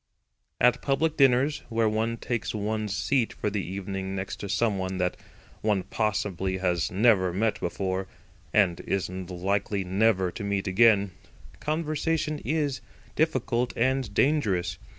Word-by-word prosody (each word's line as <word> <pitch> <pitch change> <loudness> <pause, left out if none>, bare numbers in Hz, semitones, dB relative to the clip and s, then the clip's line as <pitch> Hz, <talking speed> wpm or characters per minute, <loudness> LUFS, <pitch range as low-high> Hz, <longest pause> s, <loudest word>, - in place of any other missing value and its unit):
At 125 0 +4
public 150 +3 +1
dinners, 135 +1 +3
where 115 -1 +2
one 110 +2 0
takes 115 -1 -3
one's 105 -1 -2
seat 130 -5 +1
for 105 - -2
the 100 -1 -2
evening 95 +1 -4
next 95 0 -4
to 100 - -6
someone 95 -3 0
that 90 -1 0 0.5
one 105 -3 +1
possibly 95 -4 -1
has 90 -2 0
never 95 -2 +4
met 105 +5 0
before, 95 +1 -2 0.4
and 95 -5 +3
is 95 -2 -2
never 90 -1 -6
likely 100 +1 0
to 95 0 +1
meet 100 -1 -1
again, 100 0 +4 0.5
conversation 155 0 -1
is 145 -4 -1 0.3
difficult 125 -5 0
and 130 0 +1
dangerous. 100 - +1
105 Hz, 130 wpm, -27 LUFS, 95-125 Hz, 0.5 s, At